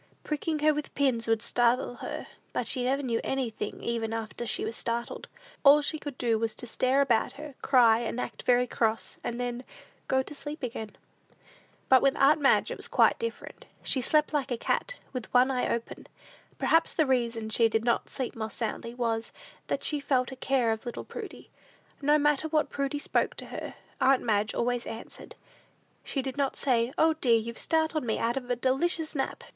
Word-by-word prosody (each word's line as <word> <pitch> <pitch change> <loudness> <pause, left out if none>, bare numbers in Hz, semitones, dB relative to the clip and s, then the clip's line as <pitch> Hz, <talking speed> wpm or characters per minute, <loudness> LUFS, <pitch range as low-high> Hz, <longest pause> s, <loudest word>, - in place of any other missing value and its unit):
Pricking 305 +1 -2
her 305 0 +5
with 300 0 -5
pins 255 -5 +1
would 225 0 +1
startle 240 +1 +1
her, - - -5 0.3
but - - -1
she 255 - +1
never 275 +2 +1
knew 235 -3 0
anything 240 -6 -3
even 225 -1 -2
after 225 +1 -4
she - - -1
was 225 - -3
startled. 235 0 -3 0.4
All 295 +1 +7
she 310 +1 -2
could 290 -4 -7
do 230 -2 +1
was 225 -1 -1
to - - -7
stare 255 +3 +2
about 240 -5 +2
her, 300 0 -9
cry, 235 -4 +5
and 235 +1 -3
act - - -5
very 245 0 +3
cross, 225 -2 -1
and 240 0 -3
then 245 0 -3 0.4
go 265 0 +2
to 295 - -9
sleep 295 0 -7
again. 220 -4 -5 0.9
But 260 -1 +6
with 275 -1 +3
aunt 290 +2 +5
Madge 275 - +4
it - - -4
was - - -3
quite - - +3
different. 460 0 -6 0.2
She 260 - +1
slept 300 +4 +2
like 285 -2 0
a 245 - -1
cat, - - -1 0.2
with 250 -4 -5
one 255 +2 +5
eye 250 -1 0
open. 235 0 -4 0.5
Perhaps 330 0 +2
the 315 - +3
reason 235 -4 0
she 225 +1 +4
did 225 +1 0
not 235 - +1
sleep 260 -3 -4
more 220 -1 -4
soundly, 230 +1 -4
was, 230 -2 -1 0.4
that - - -2
she 295 - +1
felt 260 -2 0
a - - -6
care 255 -3 +1
of 220 0 -3
little 240 - -6
Prudy. - - -9 0.5
No 295 +2 +4
matter 295 +1 +2
when 310 -1 +2
Prudy 280 +1 -2
spoke 290 - 0
to - - -8
her, - - -7 0.3
aunt 265 0 +4
Madge 210 -2 +1
always 245 0 -1
answered. 225 - -9 0.7
She 270 - -2
did 265 +1 -5
not 275 -2 0
say, 240 -2 +1
"O, 320 0 +4
dear, 250 -7 +3
you've 230 +1 -5
startled 315 -2 +1
me 225 -3 -1
out 235 +2 0
of 255 -2 -4
a 245 - +2
delicious 310 +6 +1
nap!" 270 -3 -3
250 Hz, 195 wpm, -28 LUFS, 230-280 Hz, 0.9 s, All